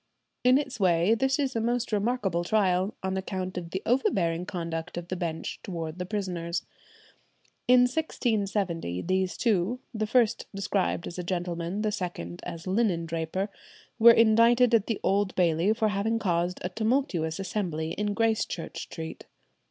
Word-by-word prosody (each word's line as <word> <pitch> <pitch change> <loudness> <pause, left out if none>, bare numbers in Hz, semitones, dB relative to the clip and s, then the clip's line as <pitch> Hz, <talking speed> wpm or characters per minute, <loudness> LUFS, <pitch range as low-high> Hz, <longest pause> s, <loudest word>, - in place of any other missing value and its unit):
In 250 +1 +6
its 270 -5 -3
way 180 +1 +4
this 265 +4 +1
is 275 -4 -1
a 225 - +1
most 240 +1 -1
remarkable 205 -5 0
trial, 190 0 +1
on 190 0 -1
account 185 -1 -3
of 175 -2 -5
the 190 +3 -4
overbearing 180 -8 +1
conduct 170 -1 -4
of 175 0 -6
the 185 - -2
Bench 170 -3 -4
towards 165 -2 -5
the 180 - -3
prisoners. 180 -4 -3 1.0
In 250 0 +7
1670 205 - -1
these 185 0 0
two, 220 +1 +1
the 215 -1 -1
first 235 -1 +2
described 195 -3 -1
as 175 - -7
gentleman, 175 +2 -3
the 215 - +1
second 175 - -5
as 165 -1 -6
linen 185 -4 +1
draper, 165 +4 -2 0.5
were 230 +1 +9
indicted 230 +2 +5
at 220 -3 +4
the 225 - -1
Old 200 0 +1
Bailey 170 +2 +3
for 220 -1 +1
having 210 +3 0
caused 175 -4 0
a 180 - -1
tumultuous 215 - 0
assembly 175 -5 -2
in 210 -1 -2
Gracechurch 215 -7 -1
Street. 160 0 -7
190 Hz, 150 wpm, -28 LUFS, 170-225 Hz, 1.0 s, were